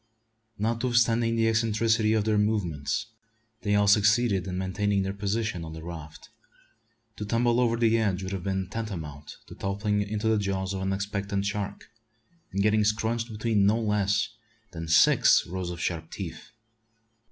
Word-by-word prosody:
Notwithstanding 115 +1 +1
the 115 0 +2
eccentricity 110 0 +2
of 110 -2 +2
their 110 -1 +2
movements, 105 -3 -1 0.6
they 105 -1 +1
all 105 0 +3
succeeded 105 -1 +3
in 90 -1 -3
maintaining 100 +1 0
their 95 0 -3
position 100 -2 -2
on 80 -1 -7
the 80 0 -8
raft. 80 -2 -9 0.9
To - - -4
tumble 120 +3 +1
over 115 -2 +2
the 115 -1 +3
edge 100 -4 0
would 95 - -5
have 95 -2 -3
been 95 0 -2
tantamount 85 -9 -6
to - - -12
toppling 100 +1 -1
into 105 +2 -2
the 110 -1 +3
jaws 95 -1 -2
of 95 - -4
an 95 0 -1
expectant 100 0 -2
shark, 100 +1 -4 0.6
and 100 - 0
getting 105 0 +3
"scrunched" 110 +2 0
between 105 -2 +1
no 110 +3 +3
less 105 0 +1 0.4
than 80 -2 -6
six 80 - +5
rows 90 0 -4
of 85 -1 -6
sharp 85 -2 -3
teeth. 85 0 -7
105 Hz, 160 wpm, -27 LUFS, 95-110 Hz, 0.9 s, six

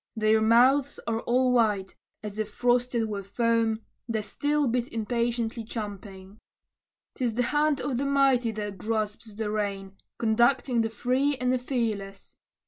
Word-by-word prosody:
Their 220 0 +3
mouths 255 +5 +4
are 225 -1 -1
all 250 +2 +2
white, 210 -6 +1 0.3
as 210 0 -6
if 215 -1 -2
frosted 245 -1 +1
with 200 -2 -5
foam, 230 0 +1 0.3
The 220 -2 -1
steel 290 +5 0
bit 245 0 -1
impatiently 235 0 -1
champing. 205 -2 -8 0.7
'Tis 240 -4 -2
the 245 - +1
hand 295 +3 +1
of 255 -4 -2
the 280 - -1
mighty 275 -4 +3
that 205 -3 -5
grasps 215 0 -3
the 215 -1 -3
rein, 200 -2 -3 0.2
Conducting 240 +2 +2
the 225 - 0
free 255 +5 0
and 250 0 +1
the 255 - +1
fearless. 220 -6 -3
230 Hz, 145 wpm, -27 LUFS, 215-250 Hz, 0.7 s, mouths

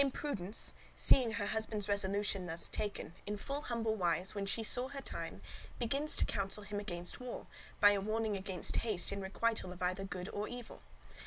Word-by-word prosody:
(Dame 280 - +3
Prudence, 225 -9 +1 0.2
seeing 245 -4 +5
her 205 -3 -1
husband's 215 -1 -1
resolution 200 -1 +1
thus 165 0 -1
taken, 205 -5 -4
in 210 0 -2
full 280 +7 -2
humble 230 -4 -1
wise, 180 -1 +1
when 200 -1 -3
she 225 +3 0
saw 245 +3 +4
her 280 +1 -6
time, - - -5 0.3
begins 275 +6 +3
to - - +4
counsel 195 +1 -1
him 205 0 -4
against 175 -4 -3
war, 250 -1 -6 0.3
by 205 0 +8
a 200 -1 +1
warning 215 +1 0
against 190 -2 0
haste 210 -6 +1
in 200 0 -3
requital 200 0 -1
of 180 0 -6
either 185 +2 0
good 180 -1 -5
or 205 +1 -3
evil. 245 -1 -8
205 Hz, 185 wpm, -35 LUFS, 190-230 Hz, 0.3 s, by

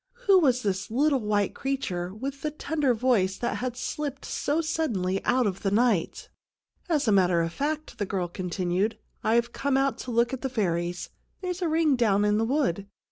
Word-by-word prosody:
Who 390 -2 +7
was 255 -6 +2
this 195 -1 -1
little 275 +4 +2
white 210 -3 0
creature 185 -10 -3
with 270 +7 -6
the 305 - -1
tender 295 -3 0
voice 215 -6 +2
that 240 - -2
had 245 -1 -3
slipped 280 0 -4
so 295 +3 -1
suddenly 230 - -1
out 255 -1 +3
of 195 -2 -2
the 195 - +1
night? 215 -4 +1 0.3
" - - -66 0.2
As 300 -6 +1
a - - +4
matter 180 -3 +4
of 165 0 -3
fact," 310 - -3
the 205 - -1
girl 185 -2 -1
continued, 180 +3 -1 0.3
I've 235 +2 +2
come 275 -1 0
out 270 0 +1
to - - -6
have 240 - -3
a - - -2
look 235 +2 +3
at 265 - -4
the 265 - -2
fairies. 175 -6 -2 0.3
There's 365 -1 -3
a 345 - +1
ring 315 -3 +3
down 210 -4 +2
in 210 +1 +2
the 225 - +2
wood. 225 - 0
235 Hz, 205 wpm, -27 LUFS, 195-280 Hz, 0.3 s, Who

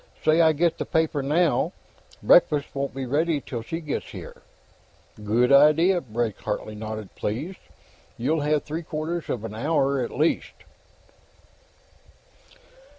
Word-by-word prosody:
"Say 155 +2 +5
I 160 -1 +5
get 165 +2 +1
the - - -2
paper 160 -3 +1
now; 155 +4 +1 0.5
breakfast 150 -4 +4
won't 140 -1 -3
be 135 -1 -3
ready 150 +4 +1
till 120 -3 -6
she 165 +9 -5
gets 150 -3 -4
here." - - -10 0.8
"Good 120 +5 +2
idea." 155 +6 +5
Blake 115 -3 -3
Hartley 105 +1 -4
nodded, 110 -1 -7
pleased. 145 - -4 0.6
"You'll 150 +6 0
have 150 0 +1
three 160 +3 -4
quarters 160 0 -4
of 115 - -3
an 110 - -6
hour, 140 +2 +1
at - - -4
least." 155 +3 0
145 Hz, 135 wpm, -25 LUFS, 120-160 Hz, 0.8 s, Say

